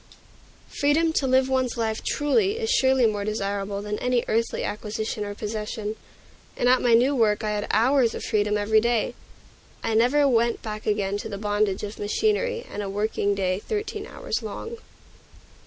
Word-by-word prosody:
Freedom 315 +3 +3
to 275 - +1
live 260 0 +3
one's 260 -2 0
life 220 -1 -1
truly 390 +8 +1
is 455 0 -1
surely 265 - +4
more 210 -2 0
desirable 200 -1 -2
than 210 0 -3
any 250 -1 +1
earthly 230 +1 0
acquisition 210 +1 -3
or 205 0 -5
possession; 215 0 -4 0.6
and 245 - +1
at 255 +1 +5
my 240 -2 +5
new 260 +5 +3
work 220 -3 +2
I 215 - 0
had 210 0 -2
hours 240 +2 +3
of - - -6
freedom 210 0 +1
every 215 +1 +3
day. 235 0 +1 0.7
I 225 - 0
never 250 +6 +4
went 235 -2 +1
back 215 -1 -6
again 205 -1 0
to 205 - -6
the 200 - -5
bondage 205 -1 0
of 210 +1 -6
machinery 435 - 0
and 210 - -5
a 200 - -4
working 205 0 0
day 185 -1 0
thirteen 420 - -4
hours - - -4
long. 465 0 -6
220 Hz, 170 wpm, -25 LUFS, 210-265 Hz, 0.7 s, at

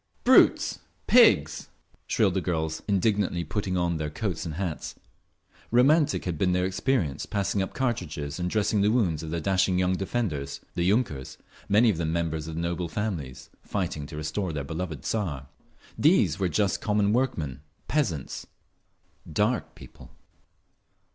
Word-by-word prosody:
"Brutes! - - +5 0.3
Pigs!" - - +4 0.4
shrilled 100 -5 +2
the 95 - 0
girls, 80 -2 -2
indignantly 100 -3 +1
putting 95 +3 -2
on 85 -1 0
their 75 -1 -3
coats 95 +1 -3
and 80 - -5
hats. 90 -4 -4 0.7
Romantic 145 +5 +3
had 85 -4 -3
been 90 -2 +2
their 90 0 +1
experience 95 - -1
passing 100 0 -1
up 95 - -4
cartridges 80 - -2
and 90 0 -1
dressing 105 0 +1
the 105 - +3
wounds 95 -10 +1
of 80 - -6
their 85 +1 -2
dashing 95 +1 +1
young 90 0 +2
defenders, 90 - -2
the 85 - -1
yunkers, 95 - -1 0.3
many 110 +3 +5
of 95 - -4
them 80 -1 -1
members 80 -2 -2
of 80 0 -6
noble 85 +1 -2
families, 80 -9 -4
fighting 85 -7 -3
to 75 - -8
restore 85 +5 -2
their 75 -2 -3
beloved 80 -1 -5
Tsar! 75 -12 -3 0.5
These 105 - +4
were 95 -2 +1
just 100 +5 0
common 105 -1 +2
workmen, 80 - -1 0.3
peasants, 95 - -2 0.8
"Dark 105 +9 0
People." - - -14
90 Hz, 150 wpm, -27 LUFS, 80-105 Hz, 0.8 s, Brutes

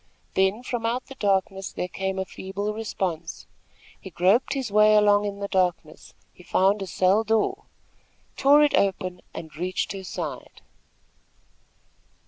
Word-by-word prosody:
Then 190 +5 +1
from 240 -2 -3
out 240 +3 -1
the 270 - -10
darkness 195 -4 -1
there 180 - -4
came 190 +1 -3
a 190 - -1
feeble 200 +3 -5
response. 185 -6 -4 0.5
He 190 - -10
groped 190 +10 +2
his 260 -6 -3
way 210 +1 +5
along 205 0 +4
in 200 0 -5
the 200 - -2
darkness. 180 -5 -2 0.2
He - - -17
found 195 +3 +2
a 195 - -4
cell 190 +4 +2
door, 225 - 0 0.7
tore 285 +2 +5
it 295 - +2
open 185 -2 0
and 160 -2 -9
reached 180 +3 -2
her 195 0 -6
side. 185 - -7
195 Hz, 145 wpm, -25 LUFS, 185-220 Hz, 0.7 s, way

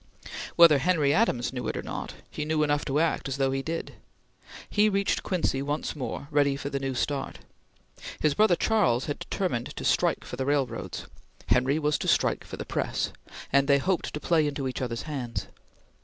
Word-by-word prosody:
Whether 165 -4 +8
Henry 150 -2 +2
Adams 130 - +1
knew 125 - -3
it - - -2
or - - -4
not, - - -5 0.2
he 150 - -3
knew 155 0 +1
enough 145 0 +1
to 140 +1 +1
act 165 -3 +1
as 135 0 -3
though 135 -1 +2
he 135 0 -1
did. 165 +4 -4 0.7
He 210 0 +3
reached 200 -1 +1
Quincy 165 -7 0
once 145 +3 -2
more, 140 0 -5
ready 145 -1 +3
for 140 0 -5
the 140 - -1
new 135 -1 -3
start. 140 +2 -2 0.8
His 155 -2 +2
brother 210 +1 +4
Charles 180 - +2
had 145 - -3
determined 175 - -2
to - - -5
strike - - +2
for 125 - -7
the 130 - -1
railroads; 140 -3 -1 0.4
Henry 130 +3 +3
was 150 -1 +1
to - - -3
strike - - +2
for - - -8
the - - -5
press; - - -1 0.4
and 140 0 +4
they 140 -1 +5
hoped 180 +5 -1
to - - -3
play 160 -1 +2
into 140 -2 -2
each 130 - -4
other's 120 -2 -3
hands. 130 -7 -4
145 Hz, 195 wpm, -27 LUFS, 135-160 Hz, 0.8 s, Whether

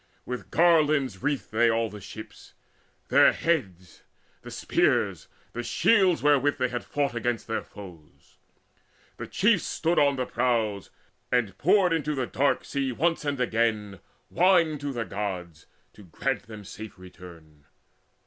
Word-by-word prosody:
With 125 0 -6
garlands 155 - +3
wreathed 145 -1 -2
they 115 +2 +3
all 115 0 +1
the 105 -1 -10
ships, 110 +3 -11 0.5
Their - - +6
heads, 95 - -2 0.4
the - - -10
spears, - - 0 0.3
the 120 - -3
shields 185 - +2
wherewith 145 -1 +3
they 125 - 0
had 120 0 -4
fought 140 -3 -2
Against 120 0 -2
their 110 - -2
foes. 80 -9 -14 0.8
The - - -6
chiefs 205 -3 +2
stood 165 +2 0
on 140 -1 +3
the 130 -1 -2
prows, 110 -6 -1 0.4
And 115 -7 +1
poured 185 +1 +3
into 150 -2 -1
the 130 -2 -1
dark 140 +4 0
sea 135 -2 -2
once 165 +7 0
and 140 -2 -2
again 110 -5 0 0.3
Wine 170 -4 +3
to 145 0 -4
the 120 -3 -3
Gods, 90 -6 -5 0.3
to - - -15
grant 125 +8 -3
them 110 -2 -10
safe 105 0 -10
return. 85 -5 -14
120 Hz, 145 wpm, -26 LUFS, 105-145 Hz, 0.8 s, Their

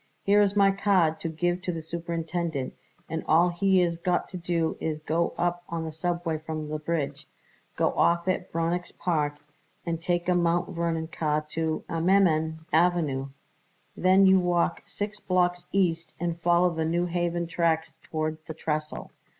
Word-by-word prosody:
"Here 205 +1 +5
is 200 0 +2
my 200 -1 +5
card 190 -5 +2
to 165 - -3
give 175 +3 -1
to 185 - -2
the 165 -2 -5
superintendent, 165 -3 -3 0.3
and 160 +1 -3
all 170 +3 +5
he 185 +1 +3
is 170 -1 -1
got 175 +1 0
to 185 - -6
do 170 -2 -1
is 155 -1 -2
to 155 - -20
go 165 +2 0
up 175 0 0
on 165 -1 -3
the 160 - -4
subway 170 0 -2
from 155 -1 -5
the 155 0 -3
bridge. 150 -2 -3 0.5
Get - - 0
off 170 +1 +2
at 185 -1 -1
Bronix 170 +2 -1
Park 150 -4 0 0.5
and 165 -1 -2
take 175 0 0
a 180 - +4
Mount 175 0 +1
Vernon 165 -2 -2
car 155 -2 -1
to 160 -1 -1
Ammerman 160 -2 +2
Avenue. 160 -5 +2 0.7
Then 190 +2 +5
you 190 0 +6
walk 175 -1 +1
six 205 +1 -5
blocks 180 -1 0
east 170 -4 0
and 170 0 -2
follow 175 +1 +4
the 160 -1 -2
New 170 +2 +1
Haven 175 0 -1
tracks 165 -1 0
toward 155 0 -3
the 160 - -6
trestle. 155 -1 -3
170 Hz, 170 wpm, -27 LUFS, 160-175 Hz, 0.7 s, you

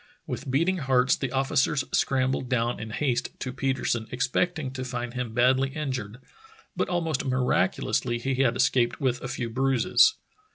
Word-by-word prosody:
With 135 +1 -5
beating 165 +8 +2
hearts 130 -2 +3
the 135 -3 -4
officers 135 +1 +1
scrambled 130 -1 +1
down 120 -1 0
in 110 - -6
haste 125 +2 -2
to 125 - -4
Petersen, 130 -4 -1
expecting 140 +4 -1
to 130 -1 -5
find 120 -1 -4
him 125 -3 -4
badly 130 +2 +3
injured, 130 -8 -4 0.6
but - - -1
almost 165 -5 -1
miraculously 125 -2 0
he 135 +3 -2
had 125 -3 +2
escaped 125 -1 +2
with 130 -3 0
a - - -4
few 125 -2 -4
bruises. 135 - +3
130 Hz, 155 wpm, -26 LUFS, 125-135 Hz, 0.6 s, hearts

